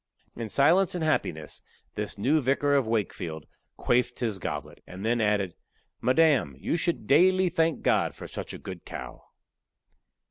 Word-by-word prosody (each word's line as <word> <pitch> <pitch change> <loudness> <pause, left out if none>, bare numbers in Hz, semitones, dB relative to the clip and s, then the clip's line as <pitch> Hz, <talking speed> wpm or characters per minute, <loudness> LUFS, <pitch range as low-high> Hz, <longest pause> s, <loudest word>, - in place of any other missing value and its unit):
In 115 -2 -5
silence 170 - +3
and 175 - -2
happiness 80 - -2 0.3
this - - -4
new 145 +10 +2
Vicar 140 +2 +1
of 135 -5 +2
Wakefield 90 -8 -3 0.3
quaffed 125 0 +1
his 110 -5 -2
goblet, - - -5
and 95 +3 -8
then 120 +1 +1
added, 100 -4 +1 0.5
"Madam, 130 - +3
you 70 - -2
should 170 -8 -1
daily 185 - +4
thank 165 -1 0
God - - +2
for - - -9
such - - -6
a - - -7
good 95 -3 -9
cow." 65 0 -8
125 Hz, 150 wpm, -27 LUFS, 100-160 Hz, 0.5 s, daily